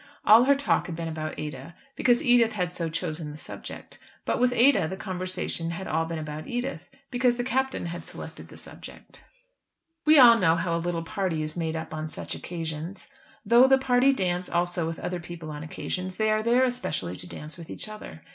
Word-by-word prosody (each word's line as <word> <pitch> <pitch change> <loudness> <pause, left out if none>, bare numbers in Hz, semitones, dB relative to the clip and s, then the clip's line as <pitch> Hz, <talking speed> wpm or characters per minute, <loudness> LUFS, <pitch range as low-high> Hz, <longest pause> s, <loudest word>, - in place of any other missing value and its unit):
All 225 +4 +8
her 280 +1 +5
talk 280 0 +1
had 170 - -5
been 165 0 -4
about 155 -1 -4
Ada, 150 +1 -6 0.2
because 245 -2 +3
Edith 240 -3 +5
had 180 -4 -2
so 170 -2 -2
chosen 155 -1 -3
the 150 - -8
subject. - - -7 0.3
But - - 0
with 250 0 +4
Ada 245 - +4
the 190 +3 -5
conversation 185 -3 -3
had 170 +3 -5
all 160 +1 0
been 165 0 -4
about 155 0 -6
Edith, 245 +3 -4 0.2
because 245 -1 +2
the 245 - -1
Captain 265 -1 -1
had 170 0 -5
selected - - -8
the - - -13
subject. - - -11 0.8
We 310 0 +6
all 235 -3 +9
know 165 -4 +4
how 170 0 0
a 170 - -1
little 170 -1 -2
party 165 -2 -2
is 155 0 -3
made 165 -2 -2
up 160 0 -5
on 155 0 -3
such - - -6
occasions. 165 - -6 0.4
Though 235 +5 +7
the 265 0 +6
party 265 0 +4
dance 180 -7 -1
also 175 -1 0
with 165 - -4
other 180 -1 -3
people 170 -2 -8
on 150 0 -6
occasions, 185 +4 -4
they 215 +1 +1
are 215 0 +2
there 240 +3 +4
especially 245 - -2
to - - -10
dance 155 +1 -8
with 170 -3 -11
each - - -5
other. 215 - -9
180 Hz, 205 wpm, -27 LUFS, 160-240 Hz, 0.8 s, all